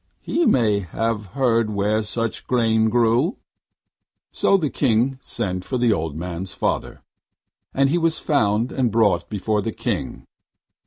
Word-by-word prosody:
He 335 -1 +1
may 110 -5 +3
have 105 +3 -3
heard 115 -4 +2
where 105 +1 0
such 115 +1 -3
grain 110 -3 +2
grew.' 120 - +2 0.9
So 195 - +3
the 155 -7 -2
King 130 +1 +1
sent 90 -2 -3
for 130 - -3
the 120 -2 +3
old 80 -6 -3
man's 90 +2 -5
father, - - -3 0.7
and 135 0 +2
he 165 +5 +1
was 165 -1 +1
found 115 -4 +1
and 130 -3 0
brought 110 -2 +2
before 105 0 -1
the 115 - -3
King. - - -4
115 Hz, 145 wpm, -22 LUFS, 105-130 Hz, 0.9 s, may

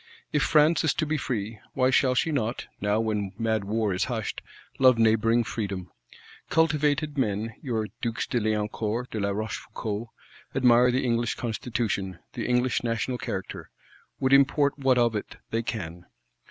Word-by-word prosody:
If 150 - +3
France 155 +4 +4
is 160 - +2
to 155 - 0
be 155 +1 -1
free, 110 -5 -3 0.2
why 130 -1 +3
shall 130 0 +3
she 160 +5 +1
not, 120 -4 -1 0.2
now 105 +1 +2
when 105 -3 -1
mad 110 -3 0
war 105 -1 0
is 90 - 0
hushed, 115 -4 -3 0.4
love 130 -2 +6
neighbouring 115 +1 +3
Freedom? 95 -6 -4 0.6
Cultivated 150 -2 +2
men, 110 -1 -1
your 115 -6 -1 0.2
Dukes 115 -1 -1
de 120 - 0
Liancourt, 110 +2 -1
de 110 - -3
la 100 0 0
Rochefoucault 110 +1 -4 0.5
admire 125 -1 +5
the 130 +2 +1
English 120 -1 +1
Constitution, 110 -5 -2 0.2
the - - -3
English 125 0 +1
National 120 +2 -1
Character; 100 -6 -5 0.5
would 130 +1 +2
import 140 +1 +4
what 130 -2 +3
of 120 -2 +3
it 105 - -4 0.2
they 115 - +1
can. 90 -7 -5
115 Hz, 155 wpm, -27 LUFS, 105-130 Hz, 0.6 s, love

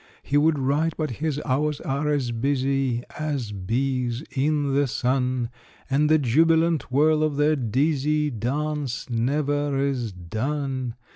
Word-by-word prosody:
He 140 - -2
would 150 +1 +4
write, 145 +4 +1
but 155 -4 -2
his 155 -2 0
hours 145 +3 0
are 140 +3 -2
as 140 -5 0
busy 135 0 0 0.2
As 145 -8 -2
bees 120 +5 -1
in 145 0 0
the 140 0 +2
sun, 125 0 0 0.4
And 150 +3 +3
the 155 - +6
jubilant 160 +3 +2
whirl 155 +3 +3
of 155 -2 0
their 150 +1 +3
dizzy 150 +4 +1
Dance 140 +3 -2
never 145 +4 0
is 135 -5 -1
done. 125 - -3
140 Hz, 135 wpm, -24 LUFS, 125-150 Hz, 0.4 s, the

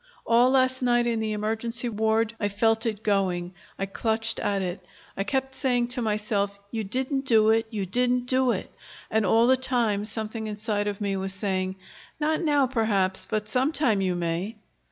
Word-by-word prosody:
All 240 +2 +5
last 260 0 +2
night, 240 -1 +3
in 230 -1 0
the 220 -1 -1
emergency 225 +3 -2
ward, 220 0 +1
I 205 - 0
felt 225 +3 +1
it 215 -1 -3
going. 185 -3 0 0.2
I 195 - -1
clutched 225 +3 -1
at 200 -1 0
it. 180 +1 -4 0.3
I 195 - -1
kept 265 +5 -2
saying 245 -3 +1
to 250 0 -3
myself: 210 -2 -1
'You 225 -1 -2
didn't 260 +6 -2
do 220 -2 +5
it, 225 0 +2
you 210 -4 -3
didn't 245 +5 +1
do 255 0 +3
it'; - - -4 0.4
and 220 -2 +2
all 225 +4 +5
the 260 +1 +5
time 235 -6 0
something 220 0 -3
inside 210 0 -1
of 205 0 -3
me 200 -1 -1
was 190 0 -2
saying, 190 -1 -1 0.4
'Not 310 +1 +1
now, 290 -4 +3
perhaps; 215 -7 0
but 215 -1 -1
sometime 255 -2 +1
you 185 -2 0
may.'" 175 +5 -2
220 Hz, 180 wpm, -26 LUFS, 200-245 Hz, 0.4 s, All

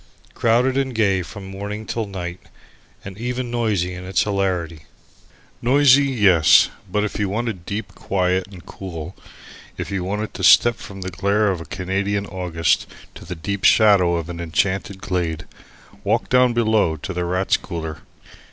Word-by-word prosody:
Crowded 125 +3 +2
and 135 -2 -1
gay 100 -4 +2
from 95 +3 -9
morning 100 +3 -6
to 115 -1 -3
night, 90 -2 -6 0.7
and 95 +1 -9
even 125 +1 -3
noisy 105 -7 0
in 90 0 -8
its 95 +1 +1
hilarity. 90 -6 -2 0.8
Noisy, 140 +2 +5
yes; 95 - +5 0.2
but 105 +1 +1
if 105 - -3
you 100 -2 0
wanted 105 -4 -3
deep 105 +1 -4
quiet 95 -1 -1
and 95 -4 -13
cool, 90 -2 -8 0.6
if - - -5
you 95 -2 -2
wanted 105 +3 -3
to - - -6
step 120 -1 +6
from 95 -1 -10
the 95 0 -5
glare 100 +3 +1
of 90 -3 -4
a - - -8
Canadian 100 +4 -2
August 90 -4 0 0.3
to - - -12
the 90 - -6
deep 100 +4 -4
shadow 100 -6 +5
of 85 -1 -3
an 85 -1 -7
enchanted 95 +3 -1
glade, 85 -5 -2 0.6
walk 110 +3 0
down 125 -1 +4
below 110 -7 +2
into 80 +5 -6
the 90 0 -2
Rats' 90 +2 +1
Cooler. 80 -4 -6
95 Hz, 160 wpm, -21 LUFS, 90-110 Hz, 0.8 s, step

